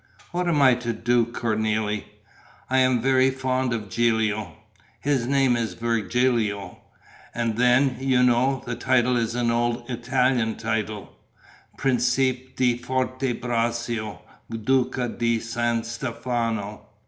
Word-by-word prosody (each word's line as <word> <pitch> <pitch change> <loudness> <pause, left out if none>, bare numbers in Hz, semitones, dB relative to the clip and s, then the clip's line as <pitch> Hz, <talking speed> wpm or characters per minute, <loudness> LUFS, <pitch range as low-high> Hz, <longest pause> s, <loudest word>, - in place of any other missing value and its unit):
What 180 0 -1
am 150 -5 +3
I 130 -1 +7
to 120 -1 -2
do, 120 +1 +1
Cornélie? 110 -2 -1 0.7
I'm 130 -2 +3
very 130 0 +4
fond 130 -1 -1
of 110 -3 -3
Gilio: 110 -3 0 0.4
his 135 -4 0
name 135 -2 +3
is 115 -2 -2
Virgilio. 115 -2 0 0.6
And 115 -2 -1
then, 125 +2 +3
you 130 -1 +2
know, 125 +2 +2
the 120 - -3
title 125 -1 +2
is 115 -1 -1
an 120 -1 +1
old 120 0 -1
Italian 125 -1 +1
title: 110 -2 -3 0.6
Principe 130 0 0
di 125 -2 +2
Forte 130 0 -1
Braccio, 115 -2 -2 0.3
Duca 125 +2 0
di 115 -1 0
San 115 0 -1
Stefano.... 115 -3 -3
120 Hz, 120 wpm, -24 LUFS, 115-130 Hz, 0.7 s, I